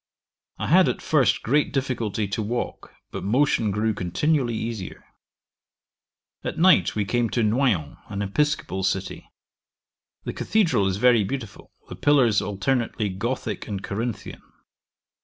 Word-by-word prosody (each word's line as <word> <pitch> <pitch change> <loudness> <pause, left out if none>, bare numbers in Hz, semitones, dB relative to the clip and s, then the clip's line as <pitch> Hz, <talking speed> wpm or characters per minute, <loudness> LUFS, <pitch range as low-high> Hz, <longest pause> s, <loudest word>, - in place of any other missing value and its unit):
I - - -3
had - - +5
at - - -2
first - - +2
great 145 +5 +2
difficulty 120 -6 -2
to 100 - -2
walk, 120 +3 -4 0.2
but - - -5
motion 115 0 +2
grew 105 +2 0
continually 120 - 0
easier. 110 -4 -5 1.4
At - - -4
night 185 +2 +4
we 105 -1 0
came 120 +2 0
to 120 - 0
Noyon, 105 - +1
an 100 0 -3
episcopal 145 -2 -1
city. 95 0 -3 0.9
The - - -4
cathedral 170 - +1
is 95 0 -1
very 120 -1 +4
beautiful, 115 0 -6 0.2
the - - -8
pillars 130 -8 +3
alternately 115 +1 -1
gothick 110 +2 -4
and 100 -2 -5
Corinthian. 110 +2 -4
110 Hz, 130 wpm, -24 LUFS, 100-130 Hz, 1.4 s, had